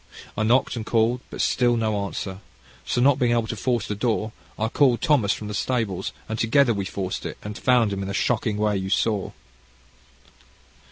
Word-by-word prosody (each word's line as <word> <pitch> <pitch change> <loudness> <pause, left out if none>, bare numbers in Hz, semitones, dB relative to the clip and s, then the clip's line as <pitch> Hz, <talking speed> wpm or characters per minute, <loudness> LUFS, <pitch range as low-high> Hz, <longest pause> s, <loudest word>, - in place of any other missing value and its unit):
I 105 - -2
knocked 120 +5 +2
and 115 - -4
called, 115 +2 +1
and - - -9
still 120 -1 +2
no 110 -3 0
answer. 95 -1 -5 0.5
So 120 - +1
not 135 +1 +4
being 120 -1 +3
able 115 -1 +1
to 115 - -4
force 120 +1 -1
the - - -2
door, 110 0 -1 0.3
I 110 - 0
called 125 0 +3
Thomas 145 - +3
from 105 - -3
the 105 - -5
stables, 110 -4 -1 0.2
and 110 0 -4
together 120 +2 +3
we 100 -2 -3
forced 95 -1 -4
it, - - -6
and 105 0 -6
found 120 -3 +2
him 100 - -3
in 95 - -4
the 100 - -4
shocking 110 -1 0
way 105 -1 +1
you 95 0 -3
saw." 105 -1 0
110 Hz, 200 wpm, -24 LUFS, 105-120 Hz, 0.5 s, not